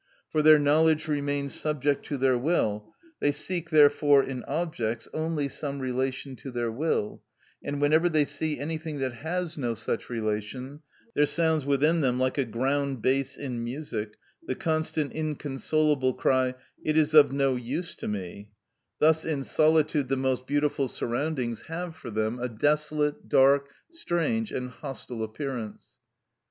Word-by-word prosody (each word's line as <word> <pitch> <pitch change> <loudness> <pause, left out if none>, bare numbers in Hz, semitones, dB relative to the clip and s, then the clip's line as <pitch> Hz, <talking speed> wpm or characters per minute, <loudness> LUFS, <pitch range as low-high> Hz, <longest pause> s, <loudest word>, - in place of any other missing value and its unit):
For 155 - +2
their 155 0 +8
knowledge 155 +2 +3
remains 145 -2 -1
subject 145 -2 0
to 145 - -2
their 130 -1 +3
will; 110 -7 0 0.3
they 145 - +2
seek, 170 +3 -3
therefore, 145 -2 +5
in 130 -2 -5
objects, 120 -8 -2
only 155 -2 -1
some 140 0 -4
relation 130 +1 -2
to 135 - -8
their 120 -2 -2
will, 120 -4 -1 0.4
and 140 0 -3
whenever 155 +4 +4
they 155 -3 +3
see 150 +2 -3
anything 155 0 -4
that 130 -2 -2
has 160 +5 -3
no 120 -3 -1
such 115 - -3
relation, 115 +5 -3 0.3
there 150 0 +3
sounds 160 -4 +1
within 150 +4 +3
them, 125 -3 +1
like 130 +2 0
a 135 - +2
ground 135 +2 -1
bass 135 +2 +1
in 125 -4 -4
music, 120 -4 -5 0.3
the - - -1
constant 155 -4 -1
inconsolable 150 -2 0
cry, 130 -1 +2 0.3
"It 155 0 +1
is 155 0 +3
of 150 -3 +8
no 135 -1 +1
use 135 +8 -4
to - - -5
me;" 100 0 -5 0.5
thus 160 +1 +4
in 150 -4 -2
solitude 155 -1 +2
the 135 +1 0
most 130 -1 -1
beautiful 145 -1 +1
surroundings 120 -1 -2
have 165 0 -5
for 130 - -9
them 110 +2 -1
a 125 +1 -2
desolate, 150 +4 0
dark, 140 +1 +4 0.2
strange, 225 - -1
and 125 0 -4
hostile 125 -3 -6
appearance. 115 -1 -5
140 Hz, 150 wpm, -27 LUFS, 125-155 Hz, 0.5 s, their